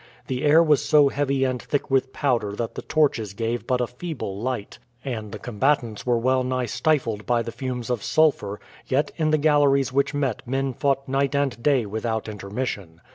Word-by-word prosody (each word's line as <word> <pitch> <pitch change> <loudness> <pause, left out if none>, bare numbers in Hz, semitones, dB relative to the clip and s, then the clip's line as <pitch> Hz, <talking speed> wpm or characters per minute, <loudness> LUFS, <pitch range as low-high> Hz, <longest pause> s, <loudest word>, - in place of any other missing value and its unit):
The 130 +1 -3
air 155 +3 +6
was 150 -3 +3
so 145 -1 +5
heavy 140 -1 0
and 130 -2 -1
thick 145 -2 -2
with 130 0 +2
powder 120 -9 0
that 115 +2 -4
the - - -6
torches 125 -10 0
gave 115 +2 -2
but 125 -1 +1
a - - +2
feeble 125 - -6
light, 125 -4 -4 0.3
and 110 -6 -4
the 105 - -5
combatants 120 -1 -1
were 120 -1 +3
well 130 +2 +2
nigh 130 0 -1
stifled 115 -5 0
by 120 -1 +2
the 115 - -5
fumes 125 0 -4
of 120 -4 -1
sulphur, 140 -11 +1 0.3
yet 140 +3 +1
in 155 -2 +1
the 155 - +3
galleries 145 -3 +3
which 140 +1 +1
met 135 -6 -1
men 135 +1 -1
fought 135 +1 0
night 135 +1 0
and 140 -4 0
day 135 -3 +2
without 110 +2 -3
intermission. 100 -4 -5
130 Hz, 190 wpm, -24 LUFS, 115-140 Hz, 0.3 s, air